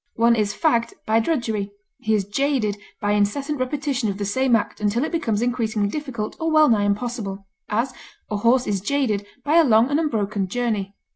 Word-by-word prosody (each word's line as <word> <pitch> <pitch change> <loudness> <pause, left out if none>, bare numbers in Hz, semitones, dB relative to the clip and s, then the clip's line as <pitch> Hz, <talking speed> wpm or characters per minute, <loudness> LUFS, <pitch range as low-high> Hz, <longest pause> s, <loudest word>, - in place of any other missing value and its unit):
One 235 +1 +4
is 210 -2 0
fagged 235 -8 +1
by 220 +1 +3
drudgery; 225 -7 -1 0.3
he 220 0 +1
is 200 -2 0
jaded 230 -1 0 0.2
by 205 - 0
incessant 265 +9 0
repetition 270 -3 -1
of 195 - -3
the 205 - -3
same 255 +4 +2
act 215 - -2
until 210 +5 +1
it 310 - -2
becomes 230 -10 0
increasingly 225 -4 0
difficult 255 -6 -4
or 325 0 0
well 310 -1 +5
nigh 210 -3 +3
impossible; 205 -2 -2 0.2
as, 235 +5 0 0.4
a 210 - 0
horse 240 +4 +3
is 200 -2 -1
jaded 215 -4 0 0.2
by 305 +3 +3
a 335 - +7
long 235 -1 +4
and 290 - +2
unbroken 210 -10 -1
journey. 210 -3 -2
230 Hz, 190 wpm, -22 LUFS, 205-270 Hz, 0.4 s, a